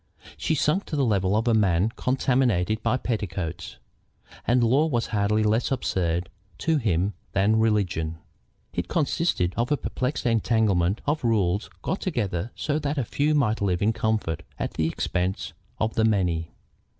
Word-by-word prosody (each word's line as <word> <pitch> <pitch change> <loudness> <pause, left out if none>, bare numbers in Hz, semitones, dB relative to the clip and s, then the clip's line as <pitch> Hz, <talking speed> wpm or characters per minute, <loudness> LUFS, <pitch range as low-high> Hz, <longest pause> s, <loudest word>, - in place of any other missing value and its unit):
She 160 - 0
sunk 155 +7 +1
to - - -4
the 140 -2 +2
level 100 -2 +2
of 115 +2 0
a 115 - +4
man 100 -2 +3
contaminated 120 -5 +1
by 115 +3 +1
petticoats. 90 -8 -4 0.7
And 120 0 +4
law 135 +7 +3
was 120 -6 0
hardly 105 +1 +2
less 110 +3 +2
absurd 90 -9 0 0.3
to 160 -1 +1
him 100 - +1 0.2
than 105 +3 +3
religion. 90 -8 0 0.6
It - - -2
consisted 150 - 0
of 120 +4 0
a 145 - +3
perplexed 130 +1 -3
entanglement 110 -5 +2
of 150 0 0
rules 105 -4 +1
got 190 - -2
together 105 - -2
so 150 0 -1
that 145 0 -2
the 135 -5 -1
few 150 +6 +1
might 115 -7 +1
live 95 -2 +1
in 110 +2 +3
comfort 110 -8 -1 0.2
at - - -3
the 80 - 0
expense 90 +3 -2 0.2
of 110 +1 -1
the 110 - +1
many. 90 -7 +1
110 Hz, 160 wpm, -25 LUFS, 95-125 Hz, 0.7 s, a